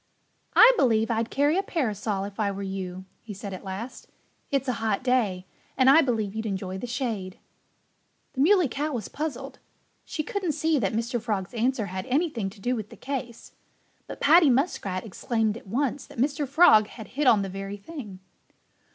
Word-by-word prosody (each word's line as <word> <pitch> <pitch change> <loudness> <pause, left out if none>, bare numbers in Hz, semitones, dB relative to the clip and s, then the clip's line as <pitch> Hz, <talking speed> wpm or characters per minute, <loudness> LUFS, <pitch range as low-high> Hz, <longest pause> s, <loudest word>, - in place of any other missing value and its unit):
"I 470 +2 +9
believe 225 - +3
I'd 225 0 0
carry 290 +6 +2
a - - +2
parasol 215 - -2
if 200 +2 -8
I 210 -2 +1
were 200 0 -5
you," 190 -1 -5 0.2
he 210 -3 -9
said 200 0 -7
at 185 - -8
last. 205 +6 -7 0.4
"It's 275 -1 0
a 255 - +1
hot 220 0 0
day 220 -8 +1 0.3
and 260 0 +6
I 320 +4 +7
believe 220 -7 -1
you'd 220 0 -3
enjoy 190 -1 -4
the 245 - -5
shade." 225 -7 -3 1.0
The 265 - -1
Muley 360 +1 +5
Cow 290 +4 -3
was 230 -5 -3
puzzled. 275 -3 -5 0.4
She 310 - -4
couldn't 360 0 -2
see 315 0 +1
that 195 -4 0
Mr. 235 +1 -1
Frog's 210 -3 -3
answer 240 -1 0
had 185 0 -5
anything 260 - 0
to 200 +2 -16
do 245 +6 -1
with 215 -3 -5
the - - -13
case. 255 -4 -6 0.6
But - - -8
Paddy 315 +1 +6
Muskrat 235 - 0
exclaimed 220 +1 -1
at 230 - -11
once 265 +5 -1
that - - -14
Mr. 280 +3 0
Frog 260 -8 +6
had 220 -1 -11
hit 285 +1 -1
on 210 -5 +5
the - - -3
very 195 +1 -6
thing. 205 - -9
230 Hz, 185 wpm, -26 LUFS, 200-275 Hz, 1.0 s, I